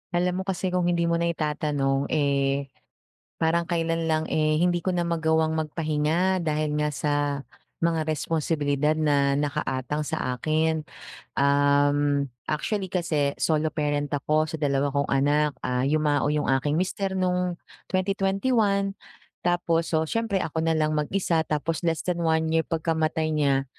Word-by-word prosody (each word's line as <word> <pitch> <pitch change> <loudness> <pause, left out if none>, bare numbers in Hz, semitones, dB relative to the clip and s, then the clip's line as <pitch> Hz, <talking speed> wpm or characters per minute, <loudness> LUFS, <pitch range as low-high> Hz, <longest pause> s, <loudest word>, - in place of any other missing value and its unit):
Alam 180 +1 +1
mo 190 - -2
kasi 185 -1 -1
kung 180 -1 +1
hindi 170 -1 +1
mo 170 0 +1
na 170 - +1
itatanong, 150 -4 0
eh, 140 -2 0 0.7
parang 165 +1 +2
kailan 165 -1 -1
lang, 160 -1 +1
eh, 155 0 +1
hindi 175 -1 +1
ko 185 - +1
na 175 - 0
magawang 160 -1 +1
magpahinga 160 +3 0
dahil 150 -1 0
nga 150 0 0
sa 150 +2 -1 0.7
mga 165 -2 +1
responsibilidad 150 -1 0
na 145 -3 +2
nakaatang 145 0 -2
sa 125 -1 -2
akin. 155 +3 0 0.5
Um, 145 0 +3 0.2
actually 190 +6 -1
kasi 155 -6 0
solo 155 -1 +1
parent 145 -1 -1
ako 155 +2 +1
sa 160 - -4
2 140 -2 +1
kong 140 0 -1
anak, 145 +2 +2
ah, 125 0 -1
yumao 145 0 +1
yung 150 -1 0
aking 145 +4 +1
mister 190 +1 -2
nung 180 -1 0 0.3
2021 195 +1 +1 0.5
tapos 170 -2 +1
so, 160 - +3
siyempre 210 +2 -1
ako 160 +1 -2
na 165 - +2
lang 155 -1 +1
mag-isa 165 +2 0
tapos 155 +2 -1
less 165 -1 0
than 180 -1 -1
1 160 -1 +1
year 160 0 +2
pagkamatay 160 -1 0
niya, 140 -3 +2
155 Hz, 145 wpm, -25 LUFS, 145-170 Hz, 0.7 s, Um